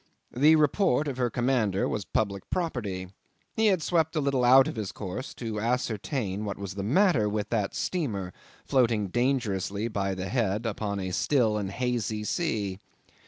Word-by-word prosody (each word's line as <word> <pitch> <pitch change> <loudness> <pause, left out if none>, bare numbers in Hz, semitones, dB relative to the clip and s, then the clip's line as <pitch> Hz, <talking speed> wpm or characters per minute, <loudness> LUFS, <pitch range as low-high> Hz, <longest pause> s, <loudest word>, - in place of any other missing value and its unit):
The 150 +5 +6
report 155 -1 +2
of 135 -3 -3
her 125 -1 +1
commander 120 -6 +1
was 105 -3 -3
public 100 -3 -2
property. 105 - -3 0.5
He 220 -1 +3
had 185 -6 +2
swept 165 -2 +1
a - - +2
little 140 -3 +1
out 130 +2 +7
of - - -4
his 105 -4 -3
course 105 +8 -6
to 110 -3 -4
ascertain 110 -2 -1
what 100 -1 -4
was 100 -1 -6
the 100 - -4
matter 135 - +3
with 105 0 -2
that 105 -4 -1
steamer 105 - -2 0.3
floating 115 -7 +2
dangerously 110 -4 0
by 100 -2 -1
the 95 +1 -4
head 115 -3 0
upon 105 -2 -2
a 95 -1 -3
still 115 +2 +2
and 100 -2 -2
hazy 115 -1 -2
sea. 105 - -2
115 Hz, 165 wpm, -27 LUFS, 100-135 Hz, 0.5 s, out